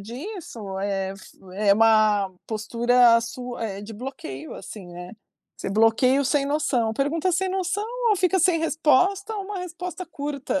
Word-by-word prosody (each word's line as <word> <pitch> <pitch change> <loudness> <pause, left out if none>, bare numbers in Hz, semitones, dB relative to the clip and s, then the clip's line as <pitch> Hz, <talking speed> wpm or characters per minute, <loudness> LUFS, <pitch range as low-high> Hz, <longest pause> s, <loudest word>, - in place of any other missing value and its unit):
disso, 235 - -7
eh, 195 -1 -1
é - - -4
f 195 - -15 0.3
é - - +8
uma 215 -3 +4 0.2
postura 235 +2 +3
su 245 +1 -6
eh, 200 -4 -4
de 220 +2 -8
bloqueio, 160 - -7
assim, 205 -4 -9
né, 175 +2 -9 0.4
você - - -5
bloqueia 225 +6 +4
o - - 0
sem 280 +1 +2
noção. 260 -6 0
Pergunta 305 +8 0
sem 375 +2 +1
noção, 380 +2 -1 0.3
ou 415 - +4
fica 370 +1 +2
sem 350 -1 +3
resposta, 360 +7 +2
ou 400 - -4
uma 405 0 -5
resposta 360 +1 -6
curta. 285 -3 -3
255 Hz, 165 wpm, -24 LUFS, 215-350 Hz, 0.4 s, é